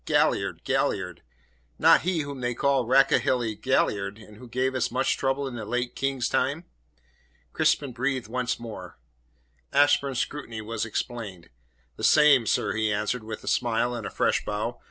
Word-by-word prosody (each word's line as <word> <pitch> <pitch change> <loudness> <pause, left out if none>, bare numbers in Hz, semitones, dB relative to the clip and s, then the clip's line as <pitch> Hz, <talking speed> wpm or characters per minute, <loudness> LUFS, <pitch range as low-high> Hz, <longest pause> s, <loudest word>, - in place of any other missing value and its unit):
"Galliard, - - +1
Galliard 90 -1 -1 0.6
not - - +6
he 175 -2 0
whom 140 -2 -6
they 120 -1 -1
called 135 -3 +1
'Rakehelly 130 -3 +3
Galliard,' 105 -4 0
and 105 -1 -14
who 125 +2 -12
gave 130 +2 0
us 130 - 0
such 125 - +1
trouble 135 +1 -1
in 130 - -6
the 110 - -5
late 125 +3 -2
King's 135 -2 -1
time?" 145 +7 0 0.9
Crispin 140 -3 +1
breathed 130 +1 -2
once 125 +1 -2
more. 115 -2 -9 0.7
Ashburn's 140 -2 +3
scrutiny 120 -4 -4
was 110 +1 -3
explained. 110 -5 -5 0.5
"The - - -8
same, 145 -6 +5
sir," - - +1
he 110 0 0
answered, 105 +3 -1
with 110 0 -7
a - - -12
smile 120 0 +1
and 120 -3 -4
a - - -5
fresh - - +1
bow. 105 +4 -3
125 Hz, 160 wpm, -26 LUFS, 110-135 Hz, 0.9 s, not